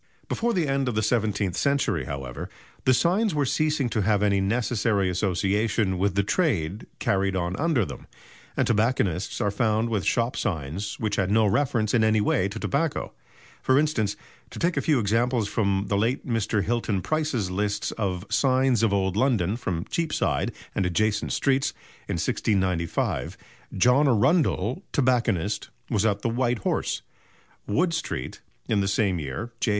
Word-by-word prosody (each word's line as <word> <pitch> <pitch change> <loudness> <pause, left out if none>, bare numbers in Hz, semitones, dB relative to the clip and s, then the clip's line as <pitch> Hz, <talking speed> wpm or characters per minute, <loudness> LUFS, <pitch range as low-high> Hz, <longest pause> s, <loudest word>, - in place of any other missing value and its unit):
Before 235 +1 0
the 175 -8 0
end 135 -1 0
of 120 - -3
the 110 - +1
seventeenth 105 -5 0
century, 140 - +1
however, 65 -3 -6 0.4
the 130 - +5
signs 185 - +2
were 145 -1 +2
ceasing 150 0 +1
to 110 - 0
have 105 0 +2
any 100 -1 +2
necessary 105 -2 +1
association 100 +1 0
with 100 0 +1
the 100 - +3
trade 105 - 0
carried 95 -1 0
on 90 0 -1
under 155 - +1
them, - - -9 0.5
and - - +3
tobacconists 105 -6 0
are 100 - +1
found 110 +1 +1
with 105 -5 -1
shop 120 +1 +1
signs 85 - -3
which 105 -2 -1
had 95 -2 +1
no 110 +1 +4
reference 110 -1 +1
in 115 -3 +4
any 110 0 +3
way 100 -2 +1
to 100 - -7
tobacco. 145 +2 -1 0.5
For 130 - +3
instance, 135 -9 +1 0.3
to - - -10
take 170 +1 +1
a - - +1
few 150 -3 +2
examples 115 +1 +1
from 100 -2 0
the 100 - +1
late 115 +5 0
Mr. 110 -3 0
Hilton 110 -4 -1
Price's 145 -11 -1
lists 105 +2 -1
of 95 -3 -3
"Signs 130 -3 +2
of 115 -3 +3
Old 95 -2 0
London" 110 -6 +2
from 90 -8 -3
Cheapside 165 -3 -1 0.2
and 100 - 0
adjacent 105 +4 0
streets, 135 -1 +1 0.3
in - - -2
1695 95 -5 -1 0.4
John 125 +9 +4
Arundell, 130 - +2
tobacconist, 115 - +1 0.2
was 110 -1 +2
at 100 -1 -1
the - - +1
"White 120 +1 0
Horse," - - -1 0.6
Wood 170 - +1
Street; 165 - -4 0.3
in 105 -2 +2
the 95 - 0
same 95 -2 +1
year 75 - -5
J. - - 0
110 Hz, 165 wpm, -25 LUFS, 100-130 Hz, 0.6 s, the